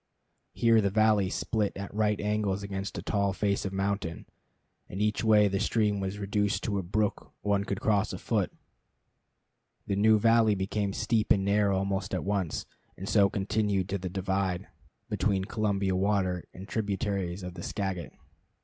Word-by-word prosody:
Here 115 -1 +4
the 100 - +1
valley 105 -2 +3
split 105 0 -1
at 100 0 -6
right 105 -1 +1
angles 105 -2 -1
against 100 0 -4
a - - -5
tall 100 -2 0
face 100 +1 0
of 95 - -2
mountain, 95 -3 -2 0.6
and 95 - -6
each 105 +1 +1
way 105 -2 +5
the 100 0 -1
stream 105 -2 +1
was 95 +1 -3
reduced 105 0 0
to 100 -2 -1
a - - -1
brook 100 +4 -1
one 100 -1 +1
could 100 -1 -3
cross 105 -1 +2
afoot. - - -1 1.3
The 100 - -1
new 110 +2 +5
valley 115 -1 +4
became 100 +1 -1
steep 110 +1 0
and 95 -1 +4
narrow 100 -1 +3
almost 95 +1 -1
at - - -2
once, 95 -5 -1 0.3
and 95 - -6
so 100 -2 +4
continued 100 -1 0
to 100 0 -1
the 90 0 -4
divide 95 -1 -1 0.4
between 95 -3 0
Columbia 100 -3 0
water 95 -2 0
and 95 +2 -10
tributaries 100 -4 -2
of 90 0 -6
the - - -8
Skagit. 95 -5 -3
100 Hz, 165 wpm, -29 LUFS, 95-105 Hz, 1.3 s, way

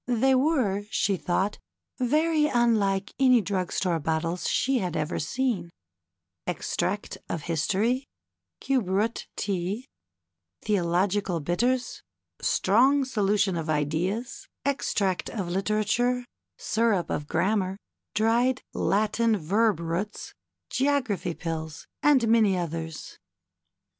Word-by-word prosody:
They 250 +2 +3
were, 255 -8 +2
she 200 -2 +1
thought, 190 +3 -1 0.4
very 305 +4 +2
unlike 215 -7 +1
any 255 -2 +6
drug 190 -4 -2
store 175 -3 0
bottles 165 +3 -1
she 265 -1 +2
had 180 -5 -2
ever 155 +2 -2
seen: 200 - -1 0.4
" 85 -1 -57
Extract - - -2
of 160 - -3
History, 210 - 0 0.5
Cube 255 -9 0
Root 210 +5 0
Tea, 200 +5 -2 0.8
Theological 190 -1 +1
Bitters, 240 - 0 0.4
Strong 265 +8 +3
Solution 205 -5 +1
of 165 -1 -3
Ideas, 160 - -1 0.2
Extract 200 -9 0
of 195 -6 -4
Literature, 215 +6 0 0.3
Syrup 220 -5 +1
of 145 - -2
Grammar, 195 0 0 0.4
Dried 235 +4 +2
Latin 215 +2 +1
Verb 205 +3 +2
Roots, 170 +5 -4 0.4
Geography 255 - 0
Pills," 160 -2 -5 0.2
and 270 -6 +4
many 220 -4 +4
others. 165 -2 -5
205 Hz, 105 wpm, -27 LUFS, 175-240 Hz, 0.8 s, any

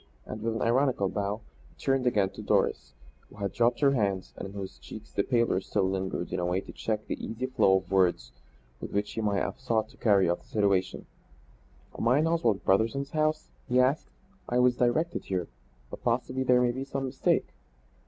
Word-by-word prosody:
And 110 - -7
with 115 0 -1
an 110 - -1
ironical 120 -4 +2
bow 100 +2 -2 0.3
he - - -26
turned 135 -2 0
again 100 -5 +2
to - - -9
Doris, 70 -3 0 0.3
who - - -16
had 100 -1 -3
dropped 120 +2 +2
her 140 -1 +5
hands, 100 -7 -1
but - - -6
in 100 - -11
whose 95 -11 -7
cheeks - - -11
the - - +1
pallor 115 -4 +1
still 95 0 0
lingered 95 -2 -3
in - - -1
a 90 - -1
way 90 +1 +1
to - - -9
check 110 -1 -3
the - - -5
easy 115 +3 -3
flow 125 -7 +3
of 95 0 -7
words 90 -11 +2 0.5
with - - -7
which 105 +1 -1
he 115 - -2
might 100 -2 +1
have - - -4
sought 115 -4 0
to - - -19
carry 100 -5 +4
off 85 +1 0
the - - -24
situation. 100 -3 0 0.9
"Am - - -1
I 125 +3 +5
in 155 - +3
Oswald 160 -12 +1
Brotherson's 115 +8 +1
house?" 155 0 0 0.2
he 125 +1 +3
asked. 130 +5 +2 0.4
"I 120 - +1
was 125 0 +4
directed 140 +8 +1
here. 90 -3 -2 0.4
But - - -8
possibly 125 +2 0
there 125 -1 +4
may 120 - +3
be 130 +2 -4
some 135 0 -3
mistake." 130 0 0
110 Hz, 210 wpm, -28 LUFS, 95-130 Hz, 0.9 s, her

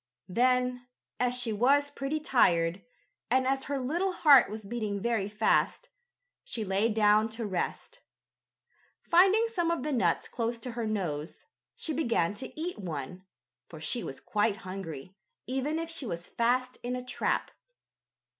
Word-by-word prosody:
Then, 250 +3 +1 0.3
as 250 0 +2
she 245 -3 0
was 280 +6 +3
pretty 285 +2 -2
tired, 175 - +2 0.5
and 260 +2 +3
as 270 0 0
her 280 0 -2
little 345 +9 -1
heart 285 - +7
was 215 0 -7
beating 210 -2 -3
very 220 -2 0
fast, 215 - +1 0.5
she 220 -3 -4
lay 195 +4 +1
down 215 0 +4
to 225 +1 -4
rest. 205 - -3 1.0
Finding 390 +6 +5
some 345 -5 +1
of 335 -6 -1
the 300 0 -1
nuts 185 -9 +1
close 235 0 -2
to 240 +2 -7
her 230 -1 -3
nose, 170 -7 -3 0.3
she 315 - -3
began 235 - +1
to 260 +8 -8
eat 350 -3 -4
one, 180 0 -6 0.4
for 160 - -10
she 235 +10 -1
was 135 - -6
quite 210 0 0
hungry, 185 -3 -7 0.3
even 265 +5 -1
if 330 0 -3
she 290 -6 -2
was 170 -3 -4
fast 250 +2 0
in 245 +1 -3
a 250 0 -5
trap. 250 - -1
235 Hz, 155 wpm, -29 LUFS, 200-270 Hz, 1.0 s, heart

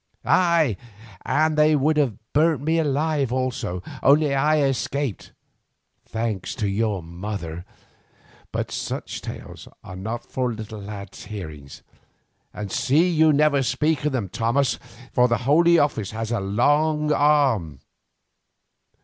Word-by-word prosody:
Aye, 165 - +3 0.5
and 155 +1 +2
they 155 0 +4
would 150 +2 +2
have 135 -9 +1 0.2
burnt 155 -2 +2
me 160 +2 +1
alive 145 -3 0
also, 125 -8 -2 0.2
only 145 +1 +4
I 150 +3 +3
escaped, 135 -3 -2 0.8
thanks 110 -4 -3
to 105 - -1
your 100 -2 -1
mother—but 85 -1 -8
such - - -4
tales - - -9 0.2
are 95 - -9
not 110 +5 -5
for 130 -1 -2
a 115 - -4
little 110 -1 -8
lad's 100 -1 -9
hearing; 80 -9 -8 0.8
and 105 -2 -6
see 160 +7 +2
you 160 -1 +4
never 145 -1 +3
speak 140 +4 0
of 150 - +1
them, 120 -7 -2
Thomas, 115 +8 0 0.3
for 125 -1 +4
the 115 -1 +1
Holy 170 +5 +5
Office 140 - +1
has 110 +1 -4
a 120 - 0
long 150 +10 +2
arm. 135 - +2
130 Hz, 130 wpm, -23 LUFS, 105-150 Hz, 0.8 s, Holy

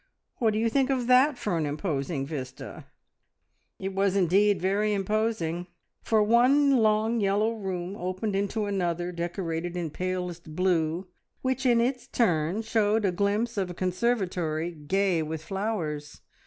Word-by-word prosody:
What 225 -3 +2
do - - -1
you 225 +1 +2
think 270 +3 +1
of 260 -3 0
that 255 +3 +5
for 180 -8 -1
an 155 - 0
imposing 145 -2 -2
vista?" 135 -4 -7 0.9
It 195 0 -4
was 195 0 +1
indeed 200 +2 +3
very 205 +3 +1
imposing, 195 -4 -1 0.3
for 220 -2 +2
one 260 +5 +4
long 220 +1 +2
yellow 205 +2 +2
room 190 -3 -4
opened 185 +3 -3
into 200 +2 -1
another 175 -3 -1
decorated 175 0 -3
in 165 -3 -3
palest 180 -2 -4
blue, 175 -1 +1 0.4
which 260 0 0
in 240 -1 +4
its 250 +1 -1
turn 180 -2 +1
showed 220 -1 +1
a 190 - +2
glimpse 205 +5 0
of 190 -2 0
a 175 - -7
conservatory 180 -4 -1
gay 175 +3 0
with 160 0 -4
flowers. 170 -7 -3
195 Hz, 145 wpm, -27 LUFS, 170-220 Hz, 0.9 s, that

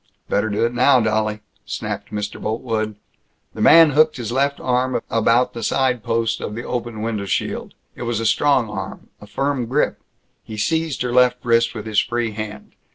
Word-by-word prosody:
"Better 105 +2 +1
do 105 +3 +1
it 120 - -1
now, 125 +2 +5
dolly!" 110 -1 0 0.2
snapped - - -5
Mr. 105 -1 -4
Boltwood. 110 -1 -2 0.6
The - - -6
man 165 -1 +7
hooked 155 +1 +3
his 120 -2 -4
left 140 +2 0
arm 125 0 0
about 115 +2 +2
the 115 - -6
side 125 +1 +1
post 115 0 -1
of 105 - -5
the 120 - -5
open 120 -3 -4
window 110 -3 -2
shield. - - -3 0.2
It - - -11
was 120 -2 -1
a 115 - -2
strong 130 +1 +3
arm, 100 -2 -7
a 105 - -11
firm 135 +3 -1
grip. 130 +5 0 0.4
He 110 - -8
seized 160 +4 0
her 125 -1 -2
left 125 0 +3
wrist 115 0 +2
with 105 - -6
his 110 -2 +2
free 120 -2 -1
hand. 105 -1 -7
115 Hz, 185 wpm, -21 LUFS, 110-125 Hz, 0.6 s, man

